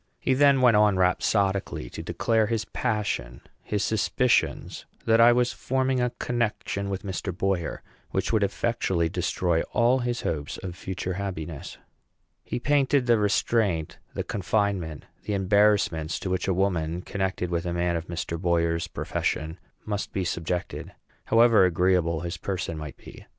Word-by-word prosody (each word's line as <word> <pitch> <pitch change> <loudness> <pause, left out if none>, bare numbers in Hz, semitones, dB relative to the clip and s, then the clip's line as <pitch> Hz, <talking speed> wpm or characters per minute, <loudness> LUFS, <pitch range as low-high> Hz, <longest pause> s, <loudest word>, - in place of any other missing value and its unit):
He 130 - +1
then 140 0 +5
went 120 -3 +6
on 105 -2 +4
rhapsodically 95 - +1
to - - -6
declare 110 -2 +1
his 110 -1 -1
passion; 105 - -2 0.2
his 105 -2 -2
suspicions 120 +3 0 0.2
that 115 0 +5
I 120 +1 +8
was 125 0 +2
forming 130 0 0
a 125 - +2
connection 110 -4 -2
with 95 -1 -4
Mr. 95 -1 -3
Boyer, 90 -1 -2 0.3
which - - -1
would 110 - +3
effectually 95 -4 0
destroy 90 -1 0
all 120 +3 +3
his 120 -1 -2
hopes 75 -2 -3
of 90 -2 -5
future 95 0 -4
happiness. 85 -6 -5 0.7
He - - -4
painted 140 0 +2
the 120 -2 +4
restraint, 105 -5 +1 0.2
the - - -2
confinement, 95 -6 -1 0.2
the 105 - -2
embarrassments 95 -5 +2
to 95 - -3
which 90 0 -1
a 95 - +2
woman 90 -3 0
connected 95 -2 -2
with 85 0 -1
a - - -1
man 85 0 0
of 85 0 -4
Mr. 85 -1 -4
Boyer's 85 -2 +1
profession 80 +3 -3 0.3
must 105 -1 -3
be 95 - -1
subjected, 85 +1 -3 0.3
however 115 -2 +5
agreeable 90 -2 +2
his 85 0 -4
person 90 -1 -3
might 75 -3 -7
be. - - -13
95 Hz, 150 wpm, -26 LUFS, 85-110 Hz, 0.7 s, I